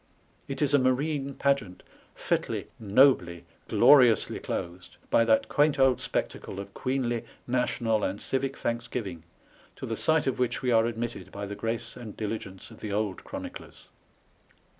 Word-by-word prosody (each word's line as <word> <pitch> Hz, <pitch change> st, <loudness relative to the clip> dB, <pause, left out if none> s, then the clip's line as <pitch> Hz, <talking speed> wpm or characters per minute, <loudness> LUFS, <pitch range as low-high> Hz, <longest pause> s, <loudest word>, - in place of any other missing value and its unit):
It 135 Hz, +2 st, -2 dB
is 145 Hz, 0 st, +2 dB
a 145 Hz, -, +6 dB
marine 135 Hz, +2 st, 0 dB
pageant 135 Hz, -10 st, 0 dB, 0.3 s
fitly, -, -, -1 dB
nobly, 100 Hz, -6 st, +3 dB, 0.2 s
gloriously 125 Hz, -3 st, +5 dB
closed 90 Hz, +1 st, -6 dB
by 115 Hz, -, +5 dB
that 110 Hz, -1 st, +3 dB
quaint 145 Hz, 0 st, +2 dB
old 135 Hz, -2 st, +4 dB
spectacle 95 Hz, -, -3 dB
of 100 Hz, 0 st, -8 dB
queenly, 125 Hz, -3 st, -1 dB, 0.2 s
national, 120 Hz, -3 st, 0 dB
and 95 Hz, +2 st, -2 dB
civic 135 Hz, +1 st, -2 dB
thanksgiving, 115 Hz, -7 st, -3 dB, 0.5 s
to -, -, -7 dB
the 115 Hz, -, -3 dB
sight 160 Hz, +5 st, +2 dB
of 130 Hz, -, -1 dB
which 125 Hz, 0 st, -1 dB
we 125 Hz, -, +1 dB
are 115 Hz, 0 st, +4 dB
admitted 115 Hz, -4 st, -5 dB
by 100 Hz, 0 st, -5 dB
the 100 Hz, -, -6 dB
grace 115 Hz, +3 st, -3 dB
and 115 Hz, -4 st, -9 dB
diligence 105 Hz, -2 st, -5 dB
of 110 Hz, -, -13 dB
the 105 Hz, -, -5 dB
old 105 Hz, -2 st, -2 dB
chroniclers. -, -, -9 dB
115 Hz, 150 wpm, -28 LUFS, 105-130 Hz, 0.5 s, a